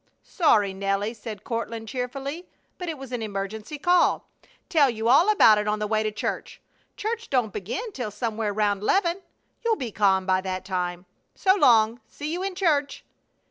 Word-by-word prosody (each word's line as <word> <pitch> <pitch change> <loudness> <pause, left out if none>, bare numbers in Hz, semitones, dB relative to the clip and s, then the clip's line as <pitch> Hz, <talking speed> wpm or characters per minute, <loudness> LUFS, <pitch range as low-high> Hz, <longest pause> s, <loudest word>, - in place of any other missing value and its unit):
"Sorry, 210 - +2
Nelly," 195 +3 -1
said 215 -2 -8
Courtland, 230 -1 -4
cheerfully, 275 - -5 0.3
"but 360 -2 -4
it 315 - -4
was 270 -2 -10
an 245 -2 -3
emergency 210 +6 -5
call. 355 +4 +2 0.4
Tell 300 -7 +4
you 225 -1 -2
about 280 - +6
it 210 - -2
on 210 0 +1
the 210 - -2
way 215 +1 +1
to 215 0 -1
church. 210 - -4 0.4
Church 460 +2 -3
don't 245 -7 +1
begin 395 - -4
till 245 - -4
somewhere 215 0 -2
round 205 -1 0
'leven. 350 - +1 0.4
You'll 460 -1 +2
be 250 - -5
calm 190 -2 +2
by 185 0 +2
that 185 -1 -4
time. 180 -1 -3 0.3
So 380 -2 +4
long! 230 - +4
See 300 +2 -5
you 355 - -3
in 385 -1 -3
church!" 300 -7 0
230 Hz, 175 wpm, -25 LUFS, 210-310 Hz, 0.4 s, about